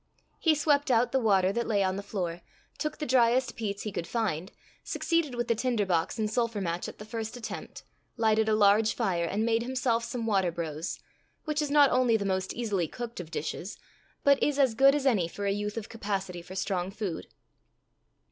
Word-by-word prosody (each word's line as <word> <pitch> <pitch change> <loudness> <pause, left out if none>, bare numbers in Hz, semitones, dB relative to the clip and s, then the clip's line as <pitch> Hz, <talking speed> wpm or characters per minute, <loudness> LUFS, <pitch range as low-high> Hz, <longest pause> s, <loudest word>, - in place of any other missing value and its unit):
He 320 -2 +4
swept 290 -1 +2
out 245 0 +3
the 265 - +2
water 195 -5 +3
that 235 +1 -1
lay 205 -3 +2
on 185 0 0
the 200 - -3
floor, 180 -4 -4 0.4
took 305 0 -2
the 305 - -3
dryest 250 -1 +3
peats 205 -3 -3
he 215 - -4
could 170 -3 -4
find, 190 -5 -2 0.3
succeeded 330 -6 0
with 240 0 -2
the - - +3
tinder 230 -2 0
box 170 -3 0
and 215 -1 0
sulphur 230 -1 -1
match 175 -2 -2
at - - -12
the 210 - -9
first 225 +1 -5
attempt, 225 - -7 0.3
lighted 220 -1 +3
a 215 - +3
large 215 +1 +4
fire, 185 -7 0
and 205 +6 -1
made 230 0 +2
himself 250 -2 0
some 235 -1 -4
water 195 -5 +2
brose 160 -1 -4 0.5
which 305 -1 0
is 300 - -1
not 285 -2 +6
only 250 -3 +3
the 200 - -3
most 190 -1 -1
easily 205 -8 -1
cooked 235 +4 -7
of 170 -3 -7
dishes, 170 +4 -4 0.5
but 280 -1 +4
is 290 -1 +1
as 265 -5 +4
good 275 +4 +6
as 290 -2 -1
any 210 -11 +3
for 200 +4 -6
a 200 - +2
youth 210 +2 -3
of 220 - -4
capacity 195 -5 -4
for 180 +2 -10
strong 190 -2 -1
food. 195 -4 -5
220 Hz, 205 wpm, -29 LUFS, 190-245 Hz, 0.5 s, not